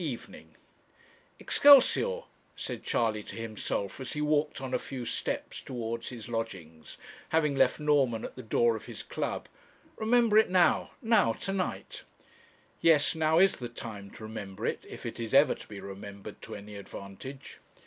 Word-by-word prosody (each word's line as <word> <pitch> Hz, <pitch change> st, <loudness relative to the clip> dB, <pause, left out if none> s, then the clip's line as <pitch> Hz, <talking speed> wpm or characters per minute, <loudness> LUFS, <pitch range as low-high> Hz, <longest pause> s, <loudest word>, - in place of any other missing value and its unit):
EVENING 135 Hz, -7 st, -7 dB, 0.8 s
'Excelsior!' 285 Hz, -, +6 dB, 0.3 s
said -, -, -5 dB
Charley 110 Hz, -2 st, 0 dB
to 100 Hz, -, -9 dB
himself, 110 Hz, -2 st, -3 dB
as 130 Hz, -, -5 dB
he 150 Hz, -, -3 dB
walked 150 Hz, 0 st, +1 dB
on 130 Hz, -1 st, -5 dB
a -, -, +2 dB
few 130 Hz, -3 st, -6 dB
steps 115 Hz, -, -3 dB
towards 115 Hz, -2 st, -4 dB
his 120 Hz, -3 st, -8 dB
lodgings, 90 Hz, -9 st, -6 dB, 0.3 s
having 150 Hz, -3 st, +2 dB
left 130 Hz, +1 st, +3 dB
Norman 140 Hz, -7 st, +2 dB
at -, -, -8 dB
the 130 Hz, -, -7 dB
door 115 Hz, 0 st, +2 dB
of 110 Hz, -, -7 dB
his -, -, -7 dB
club. -, -, -3 dB, 0.5 s
'Remember 225 Hz, -1 st, +4 dB
it 220 Hz, -, +3 dB
now 180 Hz, -1 st, +3 dB
now, 225 Hz, -, +4 dB
to 195 Hz, -, -4 dB
night.' 195 Hz, -, -3 dB, 0.8 s
Yes 160 Hz, -3 st, +4 dB
now 160 Hz, 0 st, +2 dB
is 190 Hz, +1 st, +5 dB
the 120 Hz, -2 st, -5 dB
time 105 Hz, -4 st, -8 dB
to -, -, -11 dB
remember 105 Hz, -3 st, -6 dB
it, -, -, -2 dB
if -, -, -9 dB
it -, -, -5 dB
is 115 Hz, +2 st, -2 dB
ever 140 Hz, -1 st, +6 dB
to -, -, -12 dB
be 100 Hz, -2 st, -8 dB
remembered 100 Hz, +1 st, -9 dB
to -, -, -7 dB
any 105 Hz, 0 st, -9 dB
advantage. 100 Hz, +7 st, -9 dB
125 Hz, 165 wpm, -30 LUFS, 110-155 Hz, 0.8 s, Excelsior